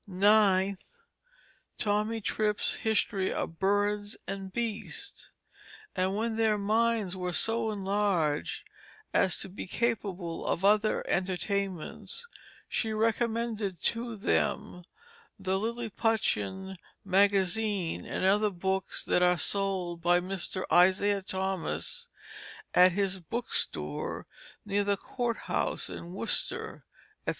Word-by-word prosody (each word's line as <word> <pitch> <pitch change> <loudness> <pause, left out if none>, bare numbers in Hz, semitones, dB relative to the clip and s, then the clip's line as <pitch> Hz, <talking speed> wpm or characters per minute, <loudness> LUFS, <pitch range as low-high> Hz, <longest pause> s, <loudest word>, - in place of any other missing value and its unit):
9th, 195 0 +4 1.0
Tommy 215 +1 0
Trip's 210 0 0
History 205 -3 +1
of 165 - -4
Birds 205 +1 +1
and 195 -1 -5
Beasts. 225 0 -5 0.7
And 190 +1 +1
when 225 +1 -1
their 220 -2 +3
minds 215 -1 +1
were 180 -1 -3
so 225 +4 +1
enlarged 195 -7 0 0.5
as 185 - +3
to - - -4
be 190 +1 -7
capable 195 -6 -2
of 190 - -1
other 215 +1 +3
entertainments 190 - -2 0.4
she 220 -1 -1
recommended 225 -3 0
to 230 0 -1
Them 200 -2 -1 0.5
the 190 0 0
Lilliputian 220 -4 -1 0.3
Magazine 195 -1 +2
and - - -2
other 210 +2 +4
Books 190 0 -2
that - - +2
are 180 0 +4
sold 185 -2 -1
by 175 +1 +4
Mr. 185 0 -3
Isaiah 190 +3 +5
Thomas 190 - -3 0.7
at 180 0 +7
his 195 -1 0
Book 230 +8 -4
Store - - -1 0.4
near 205 0 +1
the 200 0 +1
Court 240 +2 -2
House - - -1
in 175 +2 -7
Worcester, 230 - -1 0.4
&c. - - +3
200 Hz, 110 wpm, -30 LUFS, 185-220 Hz, 1.0 s, at